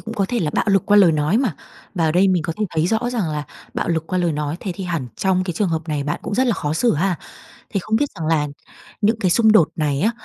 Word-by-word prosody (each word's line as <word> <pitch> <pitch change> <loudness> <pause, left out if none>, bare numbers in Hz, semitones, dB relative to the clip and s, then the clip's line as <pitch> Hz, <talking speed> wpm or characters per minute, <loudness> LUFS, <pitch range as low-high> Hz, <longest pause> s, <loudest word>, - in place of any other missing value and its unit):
cũng 225 +1 -7
có 200 -4 +1
thể 245 - -1
là 155 - 0
bạo - - +1
lực 195 -2 +2
qua 205 - +5
lời 180 -5 +6
nói 155 +7 +1
mà, 245 - 0 0.4
và 170 -4 +1
ở 155 - +2
đây 190 +3 +4
mình 180 -3 +2
có 165 - -2
thể - - +2
thấy 160 +1 +1
rõ 225 +4 0
rằng 215 -9 -1
là 150 -1 -3 0.3
bạo - - -2
lực 160 -1 -1
qua 185 - -1
lời 175 -2 +1
nói 150 +1 -2
thế 190 - -3
thì 190 - -6
hẳn 165 -8 -2
trong 185 -1 +1
cái 180 - -2
trường 190 +3 0
hợp 160 0 -3
này 145 -2 -1
bạn 145 - -2
cũng - - -4
rất 260 +2 +2
là 235 - +3
khó 150 0 -2
xử 235 +9 +2
ha? 175 +2 0 0.5
Thì 195 - -1
không 215 +4 -1
biết 290 +5 +1
rằng 160 -1 -4
là 150 -2 +2 0.5
những 220 +2 +2
cái 185 -5 +1
xung 220 +2 +5
đột 180 -8 +5
này 145 -3 0
á, 220 +5 +3
180 Hz, 300 wpm, -20 LUFS, 155-210 Hz, 0.5 s, lời